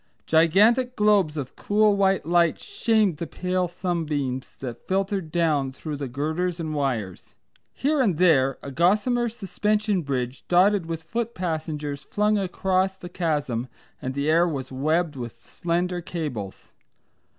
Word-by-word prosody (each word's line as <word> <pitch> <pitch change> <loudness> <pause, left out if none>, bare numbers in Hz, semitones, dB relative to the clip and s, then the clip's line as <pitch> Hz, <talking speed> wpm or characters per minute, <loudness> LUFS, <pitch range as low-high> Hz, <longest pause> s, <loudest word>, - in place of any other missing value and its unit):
Gigantic 210 +11 +4
globes 205 -7 +3
of 135 -3 -5
cool 210 0 +3
white 195 -4 +2
light 170 0 +3
shamed 220 - +1
the 170 - -4
pale 180 +2 -1
sunbeams 155 -7 -3
that 120 -3 -8
filtered 190 -3 -1
down 155 -6 +1
through 150 +3 -6
the 140 -1 -4
girders 160 +7 -2
and 155 -2 -3
wires. 120 -11 -3 0.4
Here 290 +1 +1
and 195 -11 +2
there 135 -7 +4
a 140 - -6
gossamer 215 - +2
suspension 210 -1 0
bridge 130 -3 -3
dotted 185 0 +4
with 165 -1 -4
foot 230 +7 -3
passengers 155 -5 -3
flung 210 +1 +1
across 190 0 0
the 175 - -9
chasm 145 -9 -1 0.3
and 130 +1 -4
the 140 +1 -1
air 165 +3 +4
was 135 -5 -4
webbed 155 +4 0
with 120 -2 -8
slender 175 +1 -1
cables. 145 - -5
170 Hz, 140 wpm, -25 LUFS, 145-195 Hz, 0.4 s, Gigantic